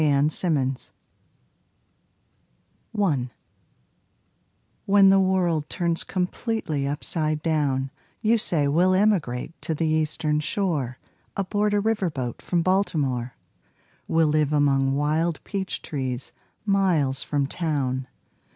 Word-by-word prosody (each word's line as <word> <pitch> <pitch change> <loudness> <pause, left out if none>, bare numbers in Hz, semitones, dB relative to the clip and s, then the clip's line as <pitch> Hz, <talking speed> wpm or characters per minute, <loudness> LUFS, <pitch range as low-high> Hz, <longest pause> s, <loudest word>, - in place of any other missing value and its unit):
WILD 145 -1 +3
PEACHES 135 -7 +1 2.0
1 160 - 0 1.6
When 195 -1 +6
the 195 0 +6
world 180 -5 +1
turns 170 -1 0
completely 180 - -2
upside 150 +2 -2
down 140 -5 0 0.3
You 225 +1 +4
say 155 -8 +1
we'll 180 +6 +3
emigrate 170 - 0
to 160 - -2
the 165 - -1
Eastern 155 -1 0
Shore 150 - -1 0.4
Aboard 205 +2 0
a - - +3
river 210 -3 0
boat 130 -6 -5
from 170 -2 0
Baltimore; 145 -10 0 0.7
We'll 165 0 +3
live 150 -1 +2
among 135 -2 +2
wild 155 +3 0
peach 195 -2 -4
trees, 130 -3 -4 0.3
miles 175 -10 +2
from 145 -1 0
town. 135 -5 -2
155 Hz, 105 wpm, -25 LUFS, 140-185 Hz, 2.0 s, When